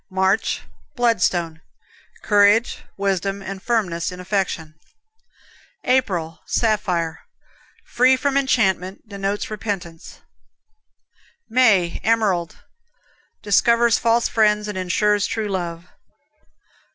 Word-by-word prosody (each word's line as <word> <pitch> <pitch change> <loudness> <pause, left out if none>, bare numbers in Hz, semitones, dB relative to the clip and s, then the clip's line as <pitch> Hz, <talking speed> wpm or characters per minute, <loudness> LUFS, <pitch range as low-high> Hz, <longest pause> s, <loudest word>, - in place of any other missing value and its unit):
March, 190 +2 0 0.3
Bloodstone 180 -9 0 0.6
Courage, 205 +2 +3 0.2
wisdom 195 0 -1
and 195 0 -7
firmness 190 -7 -1
in 180 - -9
affection. 180 -4 -2 1.1
April, 180 -11 0
Sapphire 180 -8 0 0.7
Free 255 +2 +3
from 275 +1 -1
enchantment; 200 -8 0
denotes 200 +1 -3
repentance. 195 -6 -6 1.3
May, 210 -8 +3
Emerald 205 -7 0 0.8
Discovers 235 +3 +3
false 230 +1 +2
friends, 210 -1 +2
and 210 - -5
insures 205 +3 +1
true 220 -2 -3
love. 175 -3 -4
200 Hz, 85 wpm, -21 LUFS, 180-225 Hz, 1.3 s, Courage